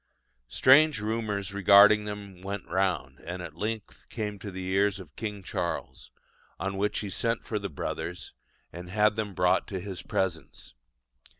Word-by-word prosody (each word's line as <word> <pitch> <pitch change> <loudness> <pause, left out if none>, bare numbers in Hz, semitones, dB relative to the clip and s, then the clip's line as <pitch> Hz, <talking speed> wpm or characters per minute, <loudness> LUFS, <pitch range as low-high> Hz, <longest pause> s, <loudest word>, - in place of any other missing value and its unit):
Strange 140 - +5
rumours 105 -2 -2
regarding 100 +2 +7
them 100 -3 -7
went 100 0 -5
round, 85 -8 -1
and 90 +5 -6
at 80 -3 -8
length 105 +3 -5
came 105 -3 -4
to 100 - -7
the 95 -1 -6
ears 100 +1 +2
of 85 -7 -12
King 105 -3 -5
Charles; 90 -2 -4 0.5
on 95 0 -2
which 105 +2 0
he 105 - -4
sent 115 +3 -1
for 105 - -2
the 100 -1 -4
brothers, 90 +4 -5 0.4
and 90 +1 -8
had 105 +2 +3
them 105 -3 -3
brought 90 0 +2
to 95 - -4
his 95 -1 -6
presence. 85 -10 -3
100 Hz, 160 wpm, -28 LUFS, 90-105 Hz, 0.5 s, regarding